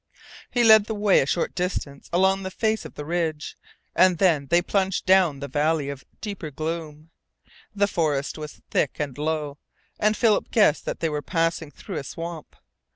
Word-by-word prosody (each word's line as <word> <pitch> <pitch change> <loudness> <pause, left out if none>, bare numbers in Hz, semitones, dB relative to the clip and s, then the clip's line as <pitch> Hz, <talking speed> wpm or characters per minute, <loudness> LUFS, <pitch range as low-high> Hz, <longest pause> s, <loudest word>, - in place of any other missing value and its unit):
He 245 - +1
led 220 -2 +7
the 220 - -4
way 205 -2 +4
a 135 - +1
short 155 +5 -1
distance 175 -6 -4
along 190 +2 +3
the 190 - -4
face 220 +3 -1
of - - -10
the 150 - -6
ridge, 160 -2 -2 0.4
and 185 -2 +5
then 160 -6 +2
they 170 +5 +4
plunged 190 0 0
down 185 -7 +4
the 140 - -4
valley 150 +1 0
of 140 -1 -7 0.2
deeper 200 -7 -5
gloom. 155 +1 -5 0.6
The 200 0 +3
forest 150 -7 -1
was 150 -1 -9
thick - - +1
and 145 -4 -3
low, 150 -1 -3 0.4
and 215 0 +2
Philip 225 -3 +2
guessed 205 -9 +3
that - - -4
they 165 - +1
were 150 -1 -2
passing 165 -1 -1
through 170 +5 -8
a - - -4
swamp. 165 +2 -7
165 Hz, 180 wpm, -24 LUFS, 150-190 Hz, 0.6 s, led